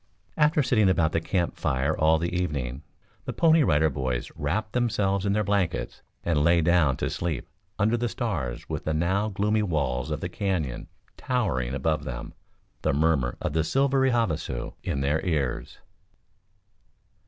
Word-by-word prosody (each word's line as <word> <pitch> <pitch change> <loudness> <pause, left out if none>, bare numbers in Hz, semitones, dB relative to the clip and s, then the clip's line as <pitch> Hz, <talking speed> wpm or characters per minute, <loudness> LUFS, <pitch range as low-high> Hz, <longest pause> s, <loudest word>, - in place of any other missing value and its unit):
After 150 -1 +3
sitting 110 -6 +3
about 85 -4 +2
the 80 - 0
camp 85 +1 -1
fire 65 +1 0
all 80 +1 +4
the 85 +2 -2
evening, 70 -7 -2 0.4
the - - -3
Pony 165 -1 +4
Rider 80 - +3
Boys 65 -2 -2
wrapped 105 +9 -2
themselves 100 -5 +1
in 100 - +2
their 105 +1 +1
blankets 100 -4 -1 0.2
and 80 -4 +1
lay 85 +2 +5
down 80 -5 +3
to - - -1
sleep 80 -7 -3 0.3
under 110 +4 +2
the 120 0 -1
stars 80 - -3
with - - -4
the 80 - 0
now 95 +6 +1
gloomy 105 +2 +1
walls 70 -8 -1
of 75 - -2
the - - -3
Canyon 90 - -2 0.3
towering 70 - -1
above 75 +2 0
them, 65 -4 -6 0.5
the - - +1
murmur 70 -4 +1
of 75 - -2
the 80 0 +2
silvery 135 +7 +2
Havasu 100 - -1
in 70 - -2
their 75 +3 +1
ears. 75 -9 -2
85 Hz, 160 wpm, -26 LUFS, 75-105 Hz, 0.5 s, lay